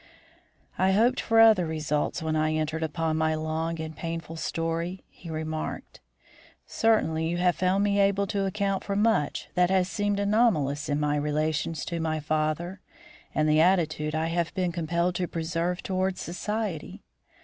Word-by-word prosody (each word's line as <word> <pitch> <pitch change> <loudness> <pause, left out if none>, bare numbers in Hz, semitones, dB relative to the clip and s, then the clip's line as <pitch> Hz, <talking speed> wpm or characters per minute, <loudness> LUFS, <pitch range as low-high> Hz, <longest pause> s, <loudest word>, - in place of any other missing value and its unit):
"I 190 +1 +3
hoped 240 +6 +3
for 225 -1 +2
other 220 -6 +6
results 155 -1 -1
when 160 0 -1
I 155 0 +1
entered 155 +1 -2
upon 160 0 -1
my 160 0 +1
long 160 +1 -2
and 160 0 -5
painful 165 -1 -5
story," 165 +3 -3
he 170 - -12
remarked. 155 0 -5 0.6
"Certainly 160 -8 +1
you 175 - -1
have 180 0 +2
found 185 +2 +1
me 200 0 +2
able 200 0 +3
to 195 0 -1
account 195 0 -1
for 200 - -3
much 210 -8 +1
that 180 -1 +3
has 185 -1 +2
seemed 205 0 -1
anomalous 195 - +2
in 145 0 +1
my 150 0 +1
relations 150 +1 -1
to 170 -1 -3
my 160 -1 -1
father 155 +5 -2 0.5
and 155 0 +2
the 155 +1 +4
attitude 155 -4 +2
I 160 +1 0
have 170 0 -1
been 180 -2 0
compelled 170 +1 0
to 180 - -1
preserve 170 +2 -2
towards 185 0 -1
society. 200 -1 -4
165 Hz, 160 wpm, -27 LUFS, 155-190 Hz, 0.6 s, other